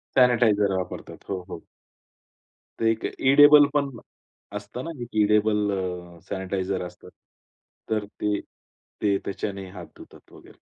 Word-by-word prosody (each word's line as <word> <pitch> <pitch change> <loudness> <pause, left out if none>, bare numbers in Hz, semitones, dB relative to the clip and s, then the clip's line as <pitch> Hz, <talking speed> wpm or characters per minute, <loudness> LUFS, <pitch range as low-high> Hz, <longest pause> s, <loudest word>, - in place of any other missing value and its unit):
Sanitiser 115 -6 +4
वापरतात. 95 - -6
हो, 95 -2 -2
हो. 85 - -7 1.2
ते 115 0 +3
एक 115 - -4
एडिबल 145 +2 +7
पण 140 -1 +1 0.7
असतं 105 +5 -7
ना 165 - -4 0.3
एडिबल 105 0 +3
अ, 90 -2 -4
सॅनिटायझर 95 -1 -2
असतात. 90 - -12 0.8
तर 110 -2 0 0.2
ते 105 -1 +1 0.6
ते 100 -2 +2
त्याच्याने 100 -1 -4
हात 90 -4 -9
धुतात - - -16
वगैरे. - - -16
105 Hz, 120 wpm, -25 LUFS, 95-115 Hz, 1.2 s, एडिबल